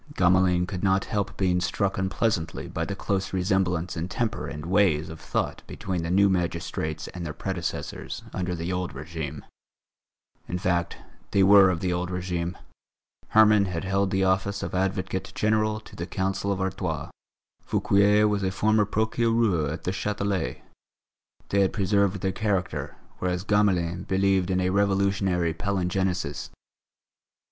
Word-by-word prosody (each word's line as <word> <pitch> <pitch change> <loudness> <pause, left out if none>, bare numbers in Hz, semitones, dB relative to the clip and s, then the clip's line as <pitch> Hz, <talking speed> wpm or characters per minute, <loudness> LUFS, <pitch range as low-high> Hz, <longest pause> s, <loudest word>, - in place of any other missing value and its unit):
Gamelin 90 -1 +3
could 90 -1 -5
not 95 0 +2
help 100 -3 -2
being 90 -2 +1
struck 95 +2 -1
unpleasantly 95 -3 -1
by 80 - -3
the 100 - -4
close 95 -1 -2
resemblance 90 -2 0
in 80 +3 -3
temper 110 - -2
and 75 -1 -6
ways 90 -5 +2
of 80 0 -8
thought - - -2
between 90 -3 -3
the 85 - -3
new 100 +3 +5
magistrates 85 -4 -2
and 90 - -7
their 80 -2 -5
predecessors 95 -3 -4
under 90 -1 -2
the 85 +2 -3
old 90 -3 -3
régime. 75 -1 -6 1.0
In 90 - -2
fact, 90 -1 0 0.3
they 100 - +3
were 100 0 +8
of 85 -3 -1
the 90 -1 0
old 90 +1 -2
régime; 90 -1 -3 0.7
Herman 105 -2 +5
had 85 -3 -3
held 95 0 +1
the 95 0 +1
office 95 +2 +1
of - - -4
Advocate 95 0 -2
General 110 0 +1
to - - -14
the 85 - -5
Council 95 +1 -1
of 95 - -1
Artois; 90 -5 -3 0.5
Fouquier 105 +1 +3
was 105 -1 0
a 95 - +1
former 105 +2 +2
Procureur 110 -6 +1
at 80 - -5
the 90 - -1
Châtelet. 100 - -2 0.9
They 100 - +2
had 95 - +2
preserved 100 -1 +1
their 95 - 0
character, 95 -2 -2 0.2
whereas 90 0 -1
Gamelin 95 -4 +1
believed 95 -1 +2
in 95 0 +1
a 90 0 +1
Revolutionary 95 -3 +1
palingenesis. 90 -3 -1
95 Hz, 150 wpm, -26 LUFS, 90-100 Hz, 1.0 s, were